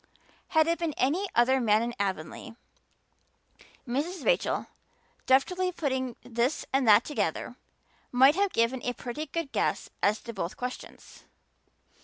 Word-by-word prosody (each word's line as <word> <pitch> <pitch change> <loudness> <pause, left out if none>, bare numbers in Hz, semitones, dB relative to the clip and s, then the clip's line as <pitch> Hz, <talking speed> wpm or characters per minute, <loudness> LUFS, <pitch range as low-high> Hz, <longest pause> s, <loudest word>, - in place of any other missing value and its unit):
Had 315 -1 +3
it 335 0 0
been 330 -3 -2
any 330 +10 +1
other 260 +3 +4
man 215 -1 +3
in 240 0 -3
Avonlea, 190 +2 -4 1.3
Mrs. 300 +9 -3
Rachel, - - +1 0.6
deftly 365 +8 +2
putting 260 -7 -2
this 245 +4 -1
and 270 -2 +2
that 215 +2 +7
together, 295 - -2 0.6
might 265 +3 +6
have 395 +2 +1
given 230 +2 +1
a 245 - -2
pretty 270 +6 -6
good 320 -1 -4
guess - - -1
as 210 +2 +2
to 235 - -8
both 190 0 -4
questions. 250 0 -8
260 Hz, 135 wpm, -28 LUFS, 235-315 Hz, 1.3 s, that